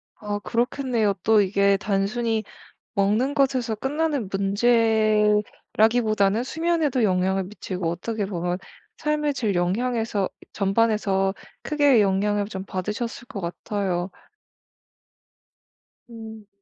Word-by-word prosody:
아. 205 -1 -4
그렇겠네요. 235 -2 0
또 220 -2 +5
이게 200 0 +3
단순히 215 +3 -1 0.5
먹는 215 +7 +2
것에서 260 -5 +1
끝나는 285 -1 -1
문제라기보다는 215 0 +2
수면에도 315 -4 0
영향을 190 0 +1
미치고 185 -3 -4
어떻게 205 +5 -3
보면 180 -2 -2 0.4
삶의 300 -1 0
질 220 -7 -1
영향에서 215 +2 0 0.2
전반에서 195 -2 +1 0.3
크게 290 -6 +4
영향을 205 +1 +1
좀 190 -2 -6
받으셨을 210 +6 -4
것 255 -7 -6
같아요. 180 +1 -2 2.0
음. 220 -2 -10
215 Hz, 245 characters per minute, -24 LUFS, 195-240 Hz, 2.0 s, 또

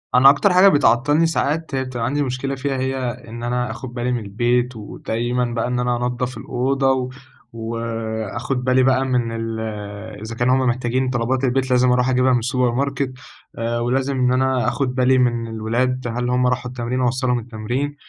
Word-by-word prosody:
أنا 135 +2 +8
أكتر 180 +7 +3
حاجة 185 +2 +7
بتعطّلني 145 0 +4
ساعات 160 -2 -1
هي 130 - 0
بتبقى 125 -3 -4
عندي 145 +3 0
مشكلة 135 +1 -2
فيها، 135 0 -2
هي 130 +1 -1 0.3
إن 120 +1 -8
أنا 125 0 -1
آخُد 120 +1 -8
بالي 125 0 -2
من 120 - 0
البيت 120 +4 0
ودايمًا 120 +3 -2
بقى 120 0 -2
إن 125 0 -1
أنا 125 0 +1
أنضّف 125 +1 -3
الأوضة 135 +1 0
و 130 -1 -1 0.4
وآخُد 115 +2 -3
بالي 130 0 +3
بقى 130 0 +3
من 125 -3 0
ال 115 0 -4 0.6
إذا 115 +1 -6
كانوا 125 +2 +2
هم - - +2
محتاجين 125 +1 0
طلبات 125 +2 0
البيت 130 0 +1
لازم 125 0 +4
أروح 125 +1 +2
أجيبها 130 0 +3
من 120 - +3
السوبر 125 0 +1
ماركت 135 +1 -1 0.4
آآ 115 +1 -1
ولازم 130 +3 0
إن 125 0 +3
أنا 130 -1 +1
آخُد 130 -3 -1
بالي 130 0 +3
من 120 -2 +1
الولاد 120 +3 -1
هل 125 0 -1
هم 125 0 +2
راحوا 125 0 -1
التمرين 125 +1 -2
أوصّلهم 125 0 +1
التمرين. 120 +5 -3
125 Hz, 180 wpm, -21 LUFS, 120-130 Hz, 0.6 s, أنا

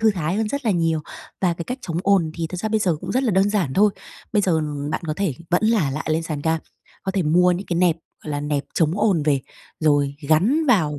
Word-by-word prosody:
thư 220 -1 +5
thái 175 -2 -2
hơn 220 -1 0
rất 280 +2 -3
là 225 - +2
nhiều. 165 -4 +1 0.4
Và 180 -2 +2
cái 170 - -6
cách 250 +7 -4
chống 170 -1 -3
ồn 195 -5 +3
thì 165 -1 -2
thật 180 - -6
ra 220 - -1
bây 220 0 +2
giờ 175 -6 +1
cũng - - -4
rất 260 +2 +1
là 245 - +2
đơn 195 +1 +3
giản 180 -11 0
thôi. 210 +2 +5 0.4
Bây 210 -2 +3
giờ, 185 - +2
ừm, 150 -2 -2
bạn - - -2
có 155 - -1
thể 195 -9 0 0.2
vẫn 180 +4 +2
là 215 -11 +2
lại 150 +3 -4
lên 160 +1 +1
sàn 155 -3 -4
cam, 160 0 +1 0.4
có 190 - -2
thể 190 -2 +1
mua 180 +4 +4
những 180 +3 -4
cái 175 - -1
nẹp, 175 -2 +3 0.3
gọi 155 - -5
là, 145 -1 -2
nẹp 145 -1 -1
chống 160 -2 +2
ồn 190 -9 +3
về 145 -3 +2 0.4
rồi 145 -2 +2
gắn 230 - +3
vào 160 - +2
170 Hz, 270 wpm, -22 LUFS, 155-200 Hz, 0.4 s, thư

